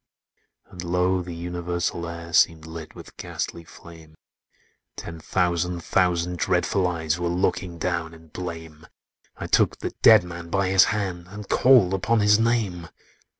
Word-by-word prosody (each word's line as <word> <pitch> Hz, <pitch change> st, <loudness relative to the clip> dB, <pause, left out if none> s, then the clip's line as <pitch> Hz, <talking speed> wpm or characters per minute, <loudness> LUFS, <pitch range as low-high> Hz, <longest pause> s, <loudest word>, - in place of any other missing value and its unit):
"And 90 Hz, -1 st, -10 dB
lo! 90 Hz, +1 st, +1 dB
the 90 Hz, -1 st, -7 dB
universal 85 Hz, 0 st, -3 dB
air 85 Hz, 0 st, -8 dB
Seemed 80 Hz, -2 st, +3 dB
lit 80 Hz, -1 st, -9 dB
with -, -, -12 dB
ghastly 85 Hz, -, -5 dB
flame; 80 Hz, -1 st, -15 dB, 0.8 s
Ten 85 Hz, -1 st, -8 dB
thousand 90 Hz, 0 st, -1 dB
thousand 90 Hz, -1 st, 0 dB
dreadful 95 Hz, +3 st, +1 dB
eyes 80 Hz, -2 st, -2 dB
Were 85 Hz, -, -1 dB
looking 90 Hz, 0 st, -1 dB
down 85 Hz, -2 st, -3 dB
in 80 Hz, 0 st, -18 dB
blame: 80 Hz, -2 st, -8 dB, 0.5 s
I -, -, -6 dB
took -, -, +2 dB
the -, -, -5 dB
dead 110 Hz, -4 st, +8 dB
man 85 Hz, -1 st, -8 dB
by 100 Hz, +1 st, 0 dB
his 95 Hz, -1 st, +6 dB
hand, 95 Hz, -5 st, -3 dB
And 105 Hz, +1 st, -9 dB
called 120 Hz, -8 st, +5 dB
upon 110 Hz, +4 st, +1 dB
his 105 Hz, +1 st, +4 dB
name! 110 Hz, -7 st, 0 dB
90 Hz, 150 wpm, -24 LUFS, 85-95 Hz, 0.8 s, dead